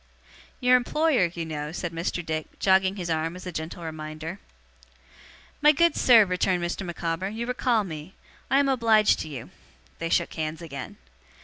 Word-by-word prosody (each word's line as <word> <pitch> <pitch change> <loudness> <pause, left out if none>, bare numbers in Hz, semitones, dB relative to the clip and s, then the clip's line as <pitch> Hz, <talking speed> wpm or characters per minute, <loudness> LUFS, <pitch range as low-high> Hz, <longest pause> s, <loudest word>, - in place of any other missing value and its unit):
'Your 250 0 +5
employer, 260 - +2
you 170 -1 -5
know,' 150 -1 -4
said 175 0 -4
Mr. 170 +1 -3
Dick, 155 -1 -4
jogging 190 0 +3
his 180 -4 -5
arm 160 +2 -1
as 180 - -10
a 180 - -4
gentle 160 +1 -6
reminder. 155 +3 -6 1.2
'My 300 +1 +7
good 335 +4 +3
sir,' 230 -4 +6
returned 180 -1 0
Mr. 175 +3 -3
Micawber, 175 +1 -3
'you 225 +3 -4
recall 245 -2 +1
me, 160 -1 -8 0.3
I 265 - +4
am 280 0 +3
obliged 225 -5 +4
to - - -4
you.' 135 -6 -8 0.5
They 165 - -2
shook - - +1
hands 155 0 -3
again. 140 -6 -8
175 Hz, 170 wpm, -26 LUFS, 160-225 Hz, 1.2 s, My